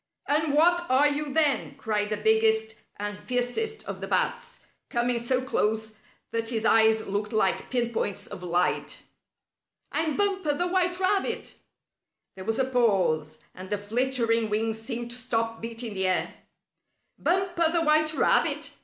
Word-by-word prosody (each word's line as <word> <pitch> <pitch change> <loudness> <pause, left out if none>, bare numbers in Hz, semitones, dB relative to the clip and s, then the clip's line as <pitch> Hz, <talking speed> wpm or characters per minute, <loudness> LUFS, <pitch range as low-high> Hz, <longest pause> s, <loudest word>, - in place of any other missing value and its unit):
And 295 0 +1
what 345 +3 +4
are 265 +3 +5
you, 290 0 -2
then?" 295 -2 +1
cried 210 -1 -1
the 210 - -1
biggest 220 +1 +2 0.2
and 205 0 -3
fiercest 250 - -2
of - - -6
the - - -4
bats, - - -1 0.3
coming 240 0 0
so 250 +2 0
close 220 -4 -1 0.3
that 230 0 -2
his 225 -2 -2
eyes 220 0 +4
looked 205 +2 -3
like 215 -4 0
pin 240 -2 -1
points 205 -2 -2
of 195 -3 -9
light. 180 0 -1 0.9
"I'm 315 -2 -1
Bumper, 390 -6 +1
the 350 - 0
white 360 0 0
rabbit!" 385 +1 0 0.8
There 190 -1 -9
was 225 +2 -1
a 265 - +2
pause, 190 -11 +1
and 185 0 -9
the 205 - 0
flittering 230 +1 0
wings 220 +1 -1
seemed 235 0 -5
to 245 - -6
stop 230 -2 -2
beating 230 0 -6
the 190 -1 0
air. 185 - 0 0.9
"Bumper, 350 -2 +1
the 335 -1 +1
white 310 0 +3
rabbit! - - +2
235 Hz, 155 wpm, -27 LUFS, 215-295 Hz, 0.9 s, are